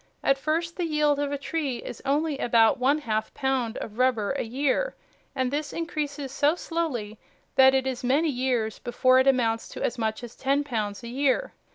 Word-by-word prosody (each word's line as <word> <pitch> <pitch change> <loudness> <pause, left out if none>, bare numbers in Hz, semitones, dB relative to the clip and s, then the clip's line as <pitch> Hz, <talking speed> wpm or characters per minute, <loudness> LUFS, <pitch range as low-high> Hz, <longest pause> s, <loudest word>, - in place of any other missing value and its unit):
At 275 0 +3
first 330 +3 -1
the 355 - 0
yield 300 -2 +2
of 290 -1 -1
a 285 - -1
tree 280 -3 -2
is - - -8
only 290 +1 0
about 230 0 +4
one 270 +4 +3
half 220 -7 -2
pound 265 -4 -1
of 215 +2 -7
rubber 245 -5 +2
a 275 - -1
year, 275 - 0 0.4
and 260 -1 0
this 290 0 -2
increases 295 -4 -4
so 290 +3 +2
slowly 265 -13 -3 0.3
that 265 0 +6
it 265 0 +1
is 255 -1 -3
many 285 +6 +2
years 245 -4 -1
before 255 +1 +3
it 260 - +3
amounts 230 -4 +2
to - - -6
as 240 +1 -1
much 220 +1 -2
as 240 0 -9
ten 275 +2 +1
pounds 215 -6 -3
a - - -6
year. 275 - 0
265 Hz, 195 wpm, -26 LUFS, 240-290 Hz, 0.4 s, that